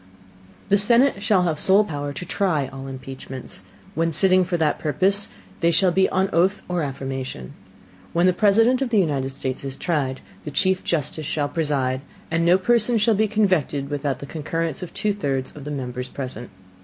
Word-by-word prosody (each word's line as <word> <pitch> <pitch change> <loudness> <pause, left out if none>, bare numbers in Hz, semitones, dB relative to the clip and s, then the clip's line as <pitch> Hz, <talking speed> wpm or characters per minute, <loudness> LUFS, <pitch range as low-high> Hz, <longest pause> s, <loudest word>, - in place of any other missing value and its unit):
The 200 0 +4
Senate 235 +1 +3
shall 200 -3 +3
have 165 -3 0
the - - -3
sole 195 +2 +5
Power 145 -6 -4
to 145 - -6
try 160 -10 0
all 135 0 -7
Impeachments. 130 0 -7 0.3
When 165 -2 0
sitting 185 +2 +4
for 180 -1 -1
that 155 -2 +1
Purpose, 195 +6 +1 0.3
they 170 - +3
shall 175 +3 +3
be 190 +2 +3
on 190 +1 +1
Oath 185 +5 +2
or 180 -1 -1
Affirmation. 135 - -5 0.6
When 170 +1 +2
the 185 - +4
President 225 +6 +4
of 265 - 0
the 225 - +2
United 145 -8 +1
States 130 -1 -4
is 135 -1 -5
tried, 140 -6 -1 0.2
the - - -5
Chief 185 +5 +1
Justice 155 -1 -2
shall 145 -2 -1
preside: 140 -5 0 0.3
And 165 0 +1
no 175 +2 +5
Person 235 +4 +3
shall 225 +1 +3
be 215 +1 +2
convicted 185 -10 +1
without 145 -1 -1
the - - -8
Concurrence 160 +1 -3
of 180 - -6
two 210 -1 -1
thirds 135 -9 -3
of 145 -2 -9
the - - -5
Members 125 -2 -4
present. 125 -3 -7
165 Hz, 190 wpm, -23 LUFS, 140-190 Hz, 0.6 s, sole